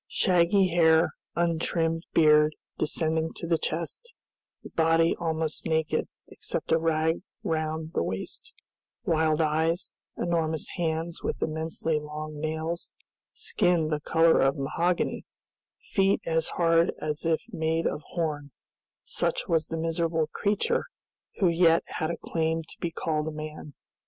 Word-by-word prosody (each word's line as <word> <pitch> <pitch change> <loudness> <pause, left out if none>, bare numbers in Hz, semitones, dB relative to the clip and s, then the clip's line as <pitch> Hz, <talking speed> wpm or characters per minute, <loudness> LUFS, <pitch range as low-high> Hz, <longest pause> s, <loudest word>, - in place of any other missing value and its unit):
Shaggy 185 +1 +3
hair, 160 -1 +4 0.2
untrimmed 165 -1 0
beard 150 -1 +5 0.2
descending 160 +1 +1
to - - -5
the 165 -1 +1
chest, 315 - -4 0.5
the - - -10
body 165 0 +3
almost 160 -2 -1
naked 160 -1 0 0.2
except - - -4
a 165 - +5
rag 160 0 +1 0.2
round 160 0 -2
the - - +1
waist, 445 - -4 0.5
wild 160 -3 +2
eyes, 160 +3 0 0.2
enormous 160 -3 0
hands 165 -1 -2
with - - -3
immensely 160 0 -1
long 150 +1 -6
nails, 160 +3 -3 0.4
skin 170 -3 +1
the 150 -1 0
color 165 +2 +4
of 135 +1 +2
mahogany, 170 +6 0 0.5
feet 195 0 +1
as 165 -1 +1
hard 165 -1 +4
as 150 -1 -2
if 165 -1 +1
made 160 -1 0
of 150 - -1
horn, 150 -3 -3 0.5
such - - -1
was 165 -2 +1
the 165 - -4
miserable 165 0 0
creature 335 - +1 0.5
who 195 - +3
yet 170 -1 +4
had 160 -2 -3
a 170 - -3
claim 160 0 -1
to - - -14
be 170 - -1
called 155 -2 -2
a - - -2
man. 155 -1 -8
160 Hz, 135 wpm, -27 LUFS, 155-170 Hz, 0.5 s, beard